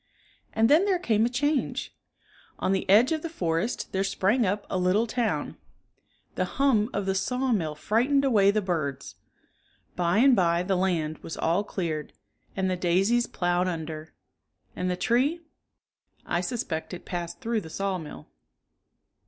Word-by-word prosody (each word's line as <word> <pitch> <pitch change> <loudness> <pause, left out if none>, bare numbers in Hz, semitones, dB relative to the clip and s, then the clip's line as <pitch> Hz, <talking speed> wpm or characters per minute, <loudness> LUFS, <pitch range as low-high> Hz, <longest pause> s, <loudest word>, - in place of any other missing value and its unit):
And 225 +1 +3
then 315 +9 +5
there 390 -3 +2
came 225 -9 +2
a - - -3
change. 285 +3 -1 0.6
On - - 0
the 190 -1 -1
edge 225 +8 +6
of 315 -1 0
the 330 - -4
forest 180 - -2
there 190 0 0
sprang 200 +4 +1
up 205 +2 -1
a 185 - -2
little 185 +5 +2
town. 235 -1 -2 0.8
The - - -1
hum 250 -6 +3
of 200 -1 -2
the 190 - +1
sawmill 210 -6 0
frightened 250 - +1
away 205 -7 +4
the 210 +1 +1
birds. 140 -7 -3 0.8
By 175 +2 +1
and 260 +2 +6
by 170 -2 +2
the 190 +1 0
land 170 -4 0
was 160 - -7
all 170 +5 +1
cleared 165 -7 -4 0.4
and 190 -1 0
the 185 - 0
daisies 190 +7 +2
ploughed 175 0 0
under. 160 -2 -5 0.6
And 180 0 -2
the 180 - -1
tree.^^ 260 - +1 0.8
I 175 - 0
suspect 180 -4 -3
it 175 - -12
passed 175 -1 -5
through 230 -1 -1
the 160 - -10
sawmill. 180 - -4
195 Hz, 155 wpm, -27 LUFS, 175-235 Hz, 0.8 s, edge